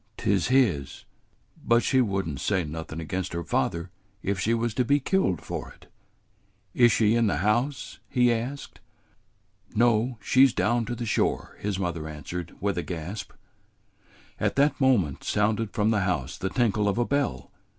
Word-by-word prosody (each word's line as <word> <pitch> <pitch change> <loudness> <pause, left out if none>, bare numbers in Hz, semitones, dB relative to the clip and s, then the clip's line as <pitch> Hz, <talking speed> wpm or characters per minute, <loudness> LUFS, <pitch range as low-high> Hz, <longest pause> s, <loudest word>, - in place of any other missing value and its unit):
"'T 100 - +1
's 95 - 0
his; 110 - +1 0.6
but 120 0 +3
she 130 -1 +3
would 95 -6 -1
n't 70 -5 -5
say 95 -4 +1
nothin' 80 +1 -6
against 90 +3 -4
her 85 0 -3
father 85 +5 -1 0.3
if 100 -1 -1
she 105 +5 0
was 115 -1 0
to 125 - +1
be 140 +4 +3
killed 135 - +1
for - - -5
it." - - -20 0.9
"Is 120 -1 +5
she 110 -1 +3
in 115 -1 +3
the 80 - 0
house?" 120 +6 0
he 125 -1 +3
asked. 125 +5 -5 1.0
"No; 120 +1 +2
she 130 +6 +5
's 130 - -4
down 120 +1 +1
to 120 +2 -4
the 120 - -4
shore," - - -1
his 100 -2 -2
mother 85 -4 -3
answered, 85 +4 -7
with 100 -3 -1
a - - 0
gasp. 90 +4 -6 1.1
At - - 0
that 145 +1 +2
moment 105 - +2
sounded 105 +1 0
from 105 -1 +1
the 110 - +2
house 80 -8 -1
the 95 - -3
tinkle 105 -2 +1
of 100 - -1
a 120 - +2
bell. 140 - -1
105 Hz, 175 wpm, -26 LUFS, 90-120 Hz, 1.1 s, Is